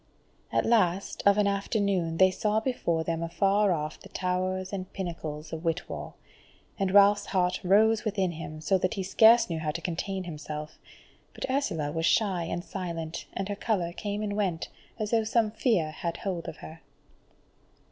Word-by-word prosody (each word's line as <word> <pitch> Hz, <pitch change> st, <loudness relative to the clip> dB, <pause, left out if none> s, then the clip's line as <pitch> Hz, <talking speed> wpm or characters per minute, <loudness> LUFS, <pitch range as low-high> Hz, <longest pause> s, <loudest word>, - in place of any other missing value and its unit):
At -, -, +1 dB
last, 195 Hz, -5 st, +2 dB
of 200 Hz, 0 st, +6 dB
an 210 Hz, -, +3 dB
afternoon, 200 Hz, -4 st, 0 dB
they 185 Hz, +1 st, +6 dB
saw 210 Hz, +3 st, +1 dB
before 195 Hz, -9 st, -1 dB
them 165 Hz, 0 st, -2 dB
afar 195 Hz, +4 st, +2 dB
off 155 Hz, -2 st, -2 dB
the -, -, -14 dB
towers 185 Hz, +1 st, -2 dB
and 185 Hz, -1 st, -5 dB
pinnacles 160 Hz, -4 st, -5 dB
of 160 Hz, +1 st, -5 dB
Whitwall, 165 Hz, 0 st, -3 dB, 0.6 s
and 195 Hz, -1 st, +1 dB
Ralph's 205 Hz, +1 st, +5 dB
heart 180 Hz, -2 st, +1 dB
rose 215 Hz, +4 st, +4 dB
within 195 Hz, -5 st, 0 dB
him, 155 Hz, -1 st, -7 dB
so 190 Hz, +4 st, +2 dB
that 185 Hz, +4 st, 0 dB
he 195 Hz, -, -2 dB
scarce 225 Hz, +5 st, +6 dB
knew 165 Hz, -2 st, -3 dB
how 155 Hz, -1 st, -2 dB
to 160 Hz, +2 st, -2 dB
contain 185 Hz, +3 st, -3 dB
himself; 150 Hz, -2 st, -7 dB, 0.6 s
but -, -, -3 dB
Ursula 165 Hz, -, -1 dB
was 165 Hz, +2 st, 0 dB
shy 185 Hz, -2 st, +2 dB
and 175 Hz, +1 st, -3 dB
silent, 170 Hz, -4 st, -5 dB
and 195 Hz, -, -3 dB
her 205 Hz, -, -3 dB
colour 190 Hz, -5 st, -1 dB
came 205 Hz, +2 st, -3 dB
and 205 Hz, -1 st, -2 dB
went, 185 Hz, -6 st, -1 dB, 0.3 s
as 215 Hz, -2 st, -3 dB
though 225 Hz, -1 st, +3 dB
some 220 Hz, -1 st, +1 dB
fear 215 Hz, -, +1 dB
had 170 Hz, +2 st, -4 dB
hold 180 Hz, -4 st, -4 dB
of -, -, -6 dB
her. 160 Hz, +1 st, -11 dB
185 Hz, 175 wpm, -28 LUFS, 165-205 Hz, 0.6 s, of